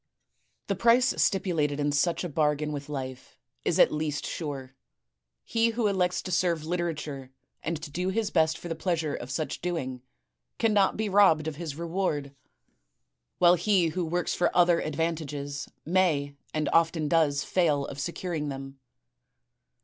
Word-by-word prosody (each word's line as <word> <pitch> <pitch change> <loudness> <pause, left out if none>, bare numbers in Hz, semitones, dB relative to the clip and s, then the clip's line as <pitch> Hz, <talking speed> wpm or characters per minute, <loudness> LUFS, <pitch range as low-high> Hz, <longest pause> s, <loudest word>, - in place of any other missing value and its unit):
The 200 - -1
price 235 +5 +4
stipulated 160 -7 +1
in 145 0 +1
such 165 +6 +1
a 175 - -3
bargain 150 0 0
with 145 -1 -6
life 130 -3 -6 0.3
is - - +1
at - - +5
least 150 -1 -2
sure. 135 -5 -5 0.7
He 230 0 +2
who 230 0 -1
elects 185 -3 +1
to 185 - -5
serve 170 -3 +1
literature 155 -6 -3 0.3
and 165 -1 -3
to 150 - -7
do 180 +5 -1
his 210 +1 -1
best 160 -1 +2
for - - -8
the 165 - -2
pleasure 160 -2 -1
of 120 - -6
such 155 +3 -3
doing, 135 -8 -3 0.6
cannot 210 -4 +3
be 220 0 -1
robbed 190 -6 +4
of 155 -2 -4
his 160 -4 -5
reward; 165 -4 -2 1.0
while 175 0 +6
he 180 -1 +2
who 175 +3 -2
works 175 +2 -1
for 175 - +2
other 175 -1 +5
advantages 150 -3 -3 0.2
may 160 -5 +1 0.2
and 155 -1 -1
often 165 -2 +3
does 145 -3 +2
fail 150 -6 +1
of 140 - -7
securing 165 0 -3
them. 135 0 -7
160 Hz, 155 wpm, -28 LUFS, 145-180 Hz, 1.0 s, while